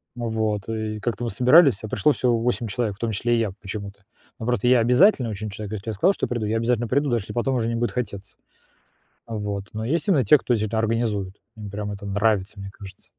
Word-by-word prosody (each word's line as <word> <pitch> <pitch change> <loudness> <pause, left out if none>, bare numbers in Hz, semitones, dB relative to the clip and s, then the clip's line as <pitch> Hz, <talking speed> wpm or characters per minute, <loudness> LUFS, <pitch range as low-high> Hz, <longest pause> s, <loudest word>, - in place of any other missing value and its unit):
Вот. 110 -3 -2
И 110 -1 -3
как-то 120 +3 -3
мы 115 - -1
собирались, 125 - +5
а 110 - -4
пришло 150 - +2
всего 125 -4 +1
8 120 0 -1
человек, 105 -1 -2
в - - -26
том 115 -1 -1
числе 120 +3 0
и - - +1
я 110 -4 0
почему-то. 100 0 -7 0.4
Ну, 110 - -5
просто 120 -1 0
я 125 -1 +6
обязательный 125 - +4
очень 105 0 -5
человек, 105 +1 -7
если 110 +1 -5
я - - -2
сказал, 180 - +3
что - - -2
приду, 120 -3 -2
я 110 +2 0
обязательно 115 0 0
приду, 140 +3 +1
даже 120 -4 0
если - - -8
потом 130 +2 0
уже 115 -2 0
не 115 - -1
будет 120 +1 -1
хотеться. 100 -5 -5 0.9
Вот. 105 -3 -4
Но 110 +1 -4
есть 165 - -1
именно 160 -10 +4
те, 130 +8 +6
кто 125 - -1
всё 110 0 -1
это 110 +2 -3
организует, 110 -4 -1 0.2
им 105 -2 -7
прям 105 +1 -4
это 100 0 -8
нравится, 105 0 0
мне 100 - -7
кажется. 95 -3 -13
110 Hz, 235 wpm, -23 LUFS, 105-120 Hz, 0.9 s, я